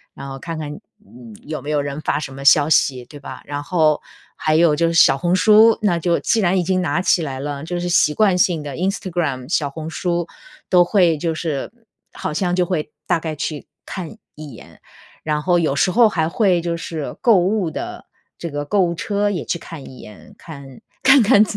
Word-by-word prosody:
然 140 Hz, -, -8 dB
后 135 Hz, 0 st, -7 dB
看 165 Hz, +3 st, -6 dB
看， 150 Hz, -2 st, -5 dB, 0.3 s
嗯， 120 Hz, -, -14 dB
有 155 Hz, 0 st, -6 dB
没 145 Hz, -, -7 dB
有 150 Hz, -1 st, +1 dB
人 140 Hz, +1 st, -4 dB
发 -, -, -1 dB
什 140 Hz, -3 st, -7 dB
么 135 Hz, +1 st, -9 dB
消 145 Hz, +1 st, +5 dB
息， 130 Hz, -5 st, +2 dB
对 145 Hz, +4 st, -12 dB
吧？ 140 Hz, -, -9 dB
然 145 Hz, 0 st, -4 dB
后 155 Hz, -2 st, +2 dB, 0.3 s
还 155 Hz, 0 st, 0 dB
有 160 Hz, -1 st, +4 dB
就 165 Hz, +2 st, +1 dB
是 165 Hz, -, -1 dB
小 135 Hz, -4 st, +5 dB
红 175 Hz, +5 st, +1 dB
书， 215 Hz, +3 st, +6 dB
那 190 Hz, -5 st, +2 dB
就 170 Hz, +1 st, +1 dB
既 230 Hz, -, +1 dB
然 190 Hz, -2 st, +2 dB
已 -, -, 0 dB
经 185 Hz, +1 st, 0 dB
拿 165 Hz, -2 st, 0 dB
起 180 Hz, -2 st, +2 dB
来 135 Hz, -4 st, -4 dB
了， 140 Hz, 0 st, -5 dB
就 175 Hz, +2 st, -4 dB
是 175 Hz, -, -3 dB
习 150 Hz, -3 st, +3 dB
惯 200 Hz, +1 st, +3 dB
性 175 Hz, -3 st, +2 dB
地 145 Hz, -2 st, -6 dB
Instagram、 175 Hz, -8 st, -2 dB
小 145 Hz, -5 st, +1 dB
红 155 Hz, +3 st, -7 dB
书 175 Hz, 0 st, -2 dB, 0.4 s
都 180 Hz, -1 st, +6 dB
会 175 Hz, -3 st, +2 dB
就 165 Hz, +2 st, -2 dB
是 155 Hz, +1 st, -4 dB, 0.4 s
好 -, -, -4 dB
像 180 Hz, +2 st, 0 dB
就 180 Hz, -1 st, +2 dB
会 160 Hz, -4 st, -3 dB, 0.2 s
大 175 Hz, -2 st, +2 dB
概 160 Hz, -1 st, -5 dB
去 150 Hz, 0 st, -5 dB, 0.2 s
看 185 Hz, +2 st, -7 dB, 0.2 s
一 150 Hz, -1 st, -9 dB
眼， 115 Hz, -, -15 dB, 0.4 s
然 150 Hz, -1 st, -1 dB
后 175 Hz, +2 st, +2 dB
有 155 Hz, -4 st, 0 dB
时 185 Hz, -, +2 dB
候 225 Hz, +2 st, +5 dB
还 160 Hz, -5 st, 0 dB
会 180 Hz, 0 st, +2 dB
就 170 Hz, 0 st, -2 dB
是 160 Hz, -3 st, -6 dB
购 230 Hz, -5 st, +5 dB
物 185 Hz, 0 st, +1 dB
的 -, -, -7 dB, 0.3 s
这 170 Hz, -, -6 dB
个 145 Hz, -1 st, -4 dB
购 200 Hz, +6 st, +1 dB
物 170 Hz, -1 st, +1 dB
车 205 Hz, +3 st, -1 dB
也 180 Hz, -6 st, -3 dB
去 -, -, -2 dB
看 155 Hz, -4 st, -10 dB
一 130 Hz, -, -13 dB
眼， 105 Hz, -1 st, -14 dB
看 140 Hz, -5 st, -12 dB, 0.2 s
看 265 Hz, 0 st, +7 dB
看 210 Hz, -1 st, +6 dB
165 Hz, 255 characters per minute, -20 LUFS, 145-180 Hz, 0.4 s, 看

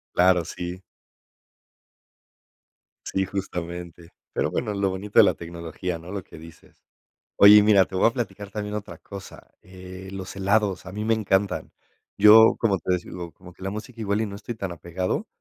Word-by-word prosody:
Claro, 90 Hz, -1 st, +4 dB
sí. 90 Hz, +3 st, -6 dB, 2.3 s
Sí, 95 Hz, -, 0 dB
justamente, 85 Hz, -3 st, -6 dB, 0.2 s
pero -, -, 0 dB
bueno, 110 Hz, -4 st, -2 dB
lo 100 Hz, -1 st, 0 dB
bonito 95 Hz, +2 st, 0 dB
de -, -, +10 dB
la -, -, +3 dB
tecnología, 85 Hz, +1 st, -6 dB
¿no?, 85 Hz, +2 st, -10 dB
lo 100 Hz, -2 st, -5 dB
que 80 Hz, -, -14 dB
dices. 80 Hz, 0 st, -16 dB, 0.5 s
Oye, 100 Hz, +1 st, +9 dB
y -, -, +8 dB
mira, 105 Hz, -2 st, +6 dB
te 95 Hz, -, -9 dB
voy -, -, +5 dB
a 115 Hz, -, 0 dB
platicar 110 Hz, -5 st, -5 dB
también 105 Hz, 0 st, -5 dB
otra 105 Hz, -1 st, -7 dB
cosa, 100 Hz, -2 st, -11 dB
eh, 95 Hz, 0 st, -11 dB
los 95 Hz, -1 st, -7 dB
helados 100 Hz, -1 st, +1 dB
a 90 Hz, -, -9 dB
mí 105 Hz, +1 st, -4 dB
me 115 Hz, 0 st, +2 dB
encantan. 100 Hz, -2 st, -1 dB, 0.4 s
Yo, 110 Hz, +2 st, +8 dB
como 105 Hz, -4 st, +1 dB
te 90 Hz, +2 st, 0 dB
digo, 85 Hz, -1 st, -7 dB
como 90 Hz, -1 st, -14 dB
que 95 Hz, -, -23 dB
la 95 Hz, +1 st, -3 dB
música 115 Hz, +3 st, -8 dB
igual 105 Hz, 0 st, 0 dB
y -, -, 0 dB
no 100 Hz, -1 st, -7 dB
estoy 115 Hz, +3 st, -7 dB
tan 100 Hz, -4 st, -5 dB
apegado, 85 Hz, +2 st, -3 dB
95 Hz, 180 wpm, -24 LUFS, 90-105 Hz, 2.3 s, de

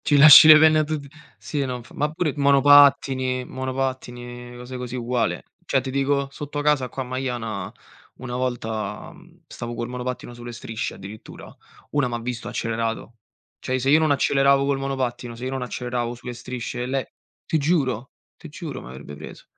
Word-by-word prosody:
Ci 145 Hz, -, +4 dB
lasci 150 Hz, +2 st, +11 dB
le 155 Hz, -1 st, +11 dB
penne 155 Hz, 0 st, +5 dB
a -, -, +3 dB
tutti. 150 Hz, -1 st, -4 dB, 0.3 s
Sì, 145 Hz, -2 st, -3 dB
non 125 Hz, -2 st, -4 dB
f -, -, -19 dB
ma 150 Hz, +1 st, -1 dB
pure 155 Hz, -2 st, -1 dB
monopattini 140 Hz, -2 st, +4 dB
monopattini, 130 Hz, -2 st, -4 dB, 0.3 s
mhmm, 120 Hz, -, -11 dB
cose 125 Hz, +1 st, -9 dB
così 125 Hz, 0 st, -6 dB
uguale. 120 Hz, -1 st, -1 dB, 0.2 s
Cioè 135 Hz, -, +2 dB
ti 130 Hz, +1 st, -5 dB
dico 140 Hz, +1 st, 0 dB
sotto 145 Hz, +1 st, -5 dB
casa 145 Hz, -4 st, +1 dB
qua 130 Hz, -, -4 dB
a -, -, -11 dB
Maiana 120 Hz, -6 st, -4 dB, 0.4 s
una 125 Hz, -1 st, -7 dB
volta, 120 Hz, -4 st, -3 dB
mhmm, -, -, -20 dB
stavo 120 Hz, 0 st, -7 dB
col 120 Hz, +1 st, -4 dB
monopattino 125 Hz, 0 st, -5 dB
sulle 120 Hz, 0 st, -9 dB
strisce 115 Hz, -1 st, -5 dB
addirittura, 100 Hz, +3 st, -11 dB, 0.4 s
una 145 Hz, -3 st, +1 dB
m'ha 120 Hz, -1 st, -3 dB
visto 120 Hz, 0 st, -5 dB
e -, -, -4 dB
ha -, -, -8 dB
accelerato. 115 Hz, 0 st, -3 dB, 0.5 s
Cioè 130 Hz, -, -2 dB
se 135 Hz, +2 st, +1 dB
io 155 Hz, -, +6 dB
non 160 Hz, -1 st, +2 dB
acceleravo 140 Hz, -1 st, +3 dB
col 140 Hz, -1 st, 0 dB
monopattino, 125 Hz, -3 st, -3 dB
se 120 Hz, +2 st, -7 dB
io 130 Hz, -, -3 dB
non 135 Hz, -1 st, -3 dB
acceleravo 120 Hz, -1 st, -3 dB
sulle 120 Hz, +1 st, -8 dB
strisce, 125 Hz, 0 st, -5 dB
le 135 Hz, 0 st, -3 dB, 0.3 s
ti 160 Hz, -, 0 dB
giuro, 135 Hz, -6 st, 0 dB, 0.3 s
ti 165 Hz, -, -11 dB
giuro 155 Hz, -1 st, -7 dB
m'avrebbe 65 Hz, +4 st, -10 dB
preso. -, -, -11 dB
130 Hz, 185 wpm, -23 LUFS, 120-140 Hz, 0.5 s, lasci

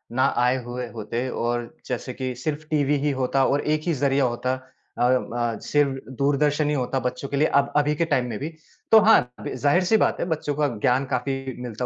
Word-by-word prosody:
ना 130 Hz, -, +3 dB, 0.2 s
आए 125 Hz, +1 st, +3 dB
हुए 120 Hz, 0 st, -5 dB
होते 115 Hz, +3 st, -4 dB
और 120 Hz, +3 st, -2 dB
जैसे 125 Hz, 0 st, -4 dB
कि 130 Hz, 0 st, -4 dB
सिर्फ़ 150 Hz, +4 st, -4 dB
टीवी 145 Hz, -1 st, +2 dB
ही 145 Hz, -, +2 dB
होता 135 Hz, +1 st, +2 dB
और 140 Hz, -, +1 dB
एक 155 Hz, -, 0 dB
ही 170 Hz, -, +2 dB
ज़रिया 140 Hz, -1 st, +1 dB
होता 125 Hz, +1 st, -1 dB
अ 130 Hz, -1 st, -7 dB
अ, 120 Hz, -2 st, 0 dB
सिर्फ 140 Hz, -2 st, +1 dB, 0.2 s
दूरदर्शन 145 Hz, +2 st, +2 dB
ही -, -, +1 dB
होता 130 Hz, 0 st, -1 dB
बच्चों 125 Hz, +2 st, -8 dB
के 140 Hz, -, -2 dB
लिए 155 Hz, -, +4 dB
अब 140 Hz, -, -1 dB
अभी 150 Hz, +1 st, +2 dB
के 170 Hz, -, +1 dB
टाइम 130 Hz, -6 st, +1 dB
में 110 Hz, -, -4 dB
भी 150 Hz, -, -3 dB, 0.4 s
तो 220 Hz, -, +9 dB
हाँ, 210 Hz, -, +5 dB, 0.2 s
ज़ाहिर-सी 180 Hz, -, +3 dB
बात -, -, +1 dB
है -, -, 0 dB
बच्चों 150 Hz, -1 st, -4 dB
का 150 Hz, 0 st, +2 dB
ज्ञान 130 Hz, +2 st, +2 dB
काफ़ी 135 Hz, 0 st, -2 dB
मिलता 125 Hz, 0 st, -4 dB
135 Hz, 210 wpm, -24 LUFS, 125-145 Hz, 0.4 s, तो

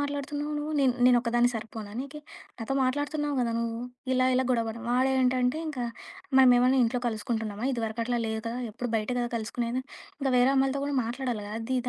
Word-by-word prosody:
మాట్లాడుతున్నావు 285 Hz, +1 st, -3 dB
నువ్వు? 300 Hz, +1 st, -3 dB
నిన్ 265 Hz, -3 st, +4 dB
నేనోక్కదాన్ని 240 Hz, -1 st, +4 dB
సరిపోనా 220 Hz, -2 st, -6 dB
నీకీ? 280 Hz, +3 st, -7 dB, 0.4 s
నాతో 230 Hz, +4 st, -3 dB
మాట్లాడుతున్నావు 290 Hz, +2 st, -1 dB
గదా! 235 Hz, -1 st, 0 dB
నువ్వు 230 Hz, 0 st, -2 dB, 0.3 s
ఇలా 255 Hz, 0 st, +3 dB
ఇలా 260 Hz, +1 st, +2 dB
గొడవపడం 230 Hz, -1 st, -1 dB
వాడేంటంటే 255 Hz, +1 st, +2 dB
ఇంకా 255 Hz, -5 st, -3 dB, 0.5 s
మనమేమన్నా 255 Hz, 0 st, +6 dB
ఇంట్లో 245 Hz, +2 st, 0 dB
కలుసుకుంటున్నామా? 220 Hz, 0 st, -3 dB
ఇదివరకట్లా 230 Hz, +1 st, -1 dB
లేదు 220 Hz, 0 st, -2 dB
కదా! 235 Hz, +2 st, -3 dB
ఎప్పుడు 240 Hz, +2 st, -5 dB
బయటే 220 Hz, +3 st, -1 dB
కదా! 240 Hz, 0 st, 0 dB
కలుసుకునేది. 235 Hz, +3 st, -2 dB, 0.4 s
ఇంక 270 Hz, -, 0 dB
వేరే 245 Hz, +2 st, +5 dB
అమ్మయిలతో 270 Hz, +1 st, +2 dB
కూడా 285 Hz, 0 st, -2 dB
మాట్లాడాలి 240 Hz, -2 st, -3 dB
గదా! 210 Hz, -, -7 dB
అదిద 250 Hz, +1 st, -1 dB
250 Hz, 160 wpm, -28 LUFS, 230-265 Hz, 0.5 s, మనమేమన్నా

